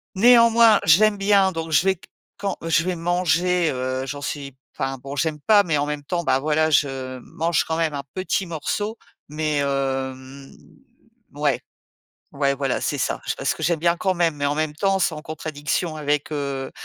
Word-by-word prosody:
néanmoins, 230 Hz, +1 st, +6 dB
j'aime 205 Hz, +6 st, +5 dB
bien, 195 Hz, -1 st, +3 dB
donc 165 Hz, -2 st, -5 dB
je 155 Hz, -, +3 dB
vais 190 Hz, 0 st, +3 dB
q 175 Hz, -, -19 dB, 0.3 s
quand 200 Hz, -1 st, -3 dB
je 165 Hz, 0 st, +2 dB
vais 185 Hz, -1 st, -1 dB
manger 175 Hz, 0 st, +1 dB
heu, 130 Hz, 0 st, -3 dB
j'en 145 Hz, +2 st, -5 dB
suis 140 Hz, 0 st, -5 dB, 0.2 s
enfin 135 Hz, 0 st, -3 dB
bon, 135 Hz, +2 st, -8 dB
j'aime 155 Hz, 0 st, -1 dB
pas, 210 Hz, +5 st, +5 dB
mais 165 Hz, -6 st, 0 dB
en 145 Hz, -, 0 dB
même 150 Hz, 0 st, -4 dB
temps, 170 Hz, +4 st, -2 dB
bah 135 Hz, -, +2 dB
voilà, 155 Hz, +2 st, +1 dB
je 130 Hz, -2 st, 0 dB
mange 165 Hz, +5 st, -1 dB
quand 160 Hz, -, -2 dB
même 165 Hz, -2 st, 0 dB
un 140 Hz, -1 st, -4 dB
petit 190 Hz, 0 st, -1 dB
morceau. 205 Hz, +7 st, -3 dB, 0.3 s
Mais, 155 Hz, -1 st, -1 dB
hem, 135 Hz, -1 st, -3 dB, 0.8 s
mouais, -, -, 0 dB, 0.7 s
ouais, 140 Hz, -1 st, +1 dB
voilà, 135 Hz, -2 st, -1 dB
c'est -, -, -1 dB
ça. -, -, -2 dB
J -, -, 0 dB
parce -, -, 0 dB
que -, -, -11 dB
j'aime 170 Hz, +1 st, +2 dB
bien 170 Hz, +1 st, +2 dB
quand 190 Hz, +2 st, 0 dB
même, 170 Hz, -3 st, +1 dB
mais 145 Hz, -, -1 dB
en 145 Hz, +1 st, 0 dB
même 155 Hz, -1 st, -1 dB
temps, 195 Hz, +4 st, +1 dB
c’est -, -, +1 dB
en 150 Hz, -, -7 dB
contradiction 155 Hz, +1 st, -3 dB
avec, 150 Hz, 0 st, -1 dB
heu, 140 Hz, -2 st, -3 dB
155 Hz, 190 wpm, -22 LUFS, 140-180 Hz, 0.8 s, néanmoins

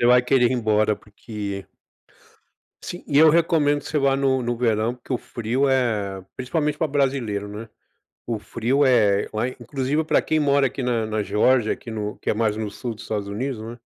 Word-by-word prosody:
já 120 Hz, -, +3 dB
vai 125 Hz, 0 st, +6 dB
querer 125 Hz, -1 st, +3 dB
ir -, -, +1 dB
embora, 110 Hz, -3 st, +2 dB
porque 100 Hz, -2 st, -7 dB, 1.2 s
Sim. 175 Hz, -, -7 dB
E 145 Hz, -2 st, +1 dB
eu 160 Hz, +1 st, +8 dB
recomendo 155 Hz, -3 st, +3 dB
que -, -, -15 dB
você 155 Hz, -, 0 dB
vá 135 Hz, -1 st, +3 dB
no 135 Hz, -1 st, +1 dB
no 120 Hz, 0 st, -1 dB
verão, 115 Hz, -1 st, +1 dB
porque 125 Hz, +1 st, -6 dB
o 125 Hz, -, +1 dB
frio 120 Hz, +5 st, -1 dB
é 105 Hz, -7 st, 0 dB
principalmente 150 Hz, +3 st, -1 dB
para 160 Hz, -, 0 dB
brasileiro, 130 Hz, -8 st, -1 dB
não 105 Hz, +2 st, -7 dB
é? 115 Hz, -, -11 dB, 0.6 s
O 115 Hz, -2 st, -2 dB
frio 125 Hz, +7 st, 0 dB
é 105 Hz, -6 st, +3 dB
lá 110 Hz, +3 st, -1 dB
inclusive 135 Hz, +5 st, -2 dB
pra -, -, +3 dB
quem 155 Hz, -, 0 dB
mora 140 Hz, -1 st, +3 dB
aqui 130 Hz, -, -4 dB
na 120 Hz, -3 st, 0 dB
na 110 Hz, -1 st, -1 dB
Geórgia, 110 Hz, +3 st, +2 dB
aqui 115 Hz, -, -8 dB
no 105 Hz, -1 st, -4 dB
que -, -, -2 dB
é -, -, +1 dB
mais 110 Hz, -1 st, 0 dB
no 110 Hz, -2 st, -3 dB
sul 115 Hz, +3 st, -5 dB
dos 110 Hz, -, -11 dB
Estados 105 Hz, -2 st, -3 dB
Unidos, 120 Hz, +3 st, -3 dB
né. 115 Hz, +2 st, -8 dB
120 Hz, 205 wpm, -23 LUFS, 110-135 Hz, 1.2 s, eu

